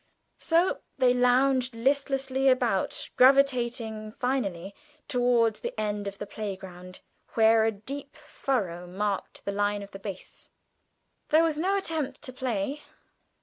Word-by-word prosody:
So 340 Hz, +3 st, +2 dB, 0.2 s
they 255 Hz, -2 st, +4 dB
lounged 250 Hz, 0 st, +3 dB
listlessly 270 Hz, +1 st, +1 dB
about, 245 Hz, -7 st, 0 dB
gravitating 240 Hz, -5 st, +3 dB
finally 200 Hz, -9 st, -2 dB, 0.3 s
towards 240 Hz, -4 st, +2 dB
the -, -, -5 dB
end 205 Hz, -1 st, -2 dB
of 200 Hz, 0 st, -6 dB
the 205 Hz, -, -5 dB
playground, 190 Hz, -3 st, -7 dB, 0.3 s
where 225 Hz, 0 st, +5 dB
a 225 Hz, -, +2 dB
deep 275 Hz, +8 st, -8 dB
furrow 230 Hz, -, -3 dB
marked 195 Hz, +2 st, -3 dB
the 200 Hz, -, -1 dB
line 205 Hz, 0 st, 0 dB
of 200 Hz, -, -12 dB
the 195 Hz, -, -9 dB
base. 195 Hz, -2 st, -9 dB, 0.8 s
There 315 Hz, +2 st, +5 dB
was 315 Hz, -2 st, 0 dB
no 385 Hz, +4 st, +1 dB
attempt 320 Hz, -9 st, -3 dB
to 255 Hz, -3 st, -4 dB
play. 255 Hz, +2 st, -2 dB
240 Hz, 130 wpm, -27 LUFS, 205-270 Hz, 0.8 s, where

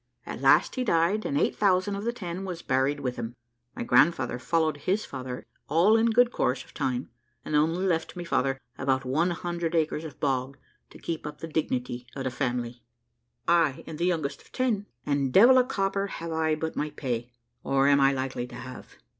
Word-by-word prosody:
At -, -, -6 dB
last -, -, +5 dB
he 255 Hz, -, -1 dB
died, 195 Hz, +1 st, +2 dB
and 140 Hz, -, -1 dB
eight -, -, +1 dB
thousand 195 Hz, 0 st, +2 dB
of 200 Hz, +2 st, -5 dB
the 235 Hz, -, +1 dB
ten 185 Hz, -5 st, -6 dB
was 180 Hz, -3 st, -6 dB
buried 135 Hz, +2 st, +1 dB
with 125 Hz, -1 st, -3 dB
him. 120 Hz, 0 st, -5 dB, 0.4 s
My -, -, -3 dB
grandfather 125 Hz, 0 st, +3 dB
followed 155 Hz, +3 st, +1 dB
his 190 Hz, +8 st, -1 dB
father 130 Hz, -2 st, -6 dB, 0.2 s
all 175 Hz, +8 st, +5 dB
in 225 Hz, +1 st, +4 dB
good 240 Hz, +2 st, +4 dB
course 130 Hz, -, 0 dB
of -, -, -20 dB
time, 125 Hz, -1 st, -2 dB, 0.3 s
and 155 Hz, -, -2 dB
only 165 Hz, +5 st, +2 dB
left 165 Hz, -3 st, 0 dB
my 175 Hz, -, -5 dB
father 135 Hz, -5 st, 0 dB, 0.2 s
about 130 Hz, 0 st, 0 dB
one 155 Hz, +8 st, +1 dB
hundred 170 Hz, -1 st, -3 dB
acres 160 Hz, -1 st, 0 dB
of 160 Hz, -, -9 dB
bog 135 Hz, -1 st, -1 dB, 0.3 s
to -, -, -14 dB
keep 165 Hz, -3 st, -4 dB
up 150 Hz, 0 st, -7 dB
the 165 Hz, -, -6 dB
dignity 125 Hz, -5 st, -2 dB
of 135 Hz, -, -4 dB
the 130 Hz, -, -2 dB
family. 120 Hz, -1 st, -3 dB, 0.7 s
I 165 Hz, -5 st, +3 dB
am 160 Hz, -, -7 dB
the 170 Hz, -, 0 dB
youngest 155 Hz, -6 st, -1 dB
of -, -, -22 dB
ten, 230 Hz, -6 st, 0 dB, 0.2 s
and 140 Hz, -2 st, 0 dB
devil 245 Hz, -, +7 dB
a -, -, +5 dB
copper 195 Hz, -4 st, -1 dB
have 165 Hz, -4 st, -6 dB
I 160 Hz, -1 st, +1 dB
but 160 Hz, +1 st, -4 dB
my 150 Hz, -, -1 dB
pay, 120 Hz, -4 st, -4 dB, 0.3 s
or 135 Hz, 0 st, +2 dB
am 140 Hz, 0 st, +5 dB
I 135 Hz, 0 st, +5 dB
likely 130 Hz, -2 st, -3 dB
to -, -, -11 dB
have. 130 Hz, -1 st, -10 dB
155 Hz, 205 wpm, -27 LUFS, 130-180 Hz, 0.7 s, devil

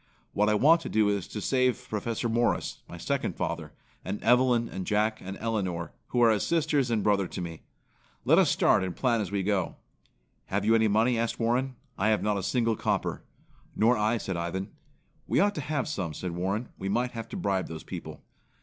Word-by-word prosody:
What 105 Hz, +1 st, +2 dB
I 105 Hz, -, +3 dB
want 160 Hz, +9 st, +5 dB
to -, -, -6 dB
do 110 Hz, -1 st, +3 dB
is 100 Hz, -3 st, -1 dB
to 105 Hz, -, -6 dB
save 130 Hz, -1 st, +1 dB
Professor 115 Hz, +2 st, -2 dB
Morris, 120 Hz, +1 st, 0 dB
my -, -, -8 dB
second -, -, -2 dB
father, -, -, -3 dB, 0.3 s
and 100 Hz, +4 st, -4 dB
Evelyn 125 Hz, -1 st, +4 dB
and 95 Hz, -4 st, -6 dB
Jack 110 Hz, +1 st, +1 dB
and 95 Hz, +1 st, -6 dB
Elinor, 95 Hz, -7 st, -2 dB, 0.2 s
who 120 Hz, -1 st, +2 dB
are 115 Hz, -, +6 dB
as 105 Hz, -, +1 dB
sisters 155 Hz, -6 st, +1 dB
and 115 Hz, -3 st, +1 dB
brother 100 Hz, -3 st, +2 dB
to -, -, -7 dB
me. 85 Hz, -3 st, -6 dB, 0.6 s
Let -, -, +6 dB
us -, -, +4 dB
start -, -, +3 dB
and 90 Hz, -2 st, -3 dB
plan 120 Hz, -4 st, +1 dB
as 100 Hz, -, -3 dB
we 100 Hz, -1 st, 0 dB
go." 95 Hz, -2 st, 0 dB, 0.7 s
"Have 100 Hz, +1 st, -1 dB
you 110 Hz, -, +4 dB
any 110 Hz, -1 st, +4 dB
money?" 115 Hz, +3 st, +2 dB
asked 115 Hz, 0 st, -1 dB
Warren. 125 Hz, +3 st, 0 dB, 0.2 s
"I 100 Hz, -, +2 dB
have 110 Hz, -1 st, +2 dB
not 105 Hz, 0 st, +1 dB
a -, -, -3 dB
single 115 Hz, +2 st, +1 dB
copper." -, -, -1 dB, 0.5 s
"Nor 115 Hz, +3 st, +4 dB
I," 110 Hz, +2 st, +1 dB
said 95 Hz, -4 st, -3 dB
Ivan. 85 Hz, +3 st, -3 dB, 0.6 s
"We -, -, +2 dB
ought 205 Hz, +1 st, +3 dB
to 155 Hz, -, -4 dB
have 145 Hz, -1 st, -2 dB
some," 90 Hz, -, -3 dB
said 90 Hz, -, -4 dB
Warren. 95 Hz, +7 st, -2 dB
"We 95 Hz, -, -3 dB
might 120 Hz, +4 st, 0 dB
have 115 Hz, -1 st, -7 dB
to 205 Hz, -, -5 dB
bribe 95 Hz, -, 0 dB
those 80 Hz, -1 st, -7 dB
people." -, -, -8 dB
110 Hz, 210 wpm, -28 LUFS, 95-120 Hz, 0.7 s, are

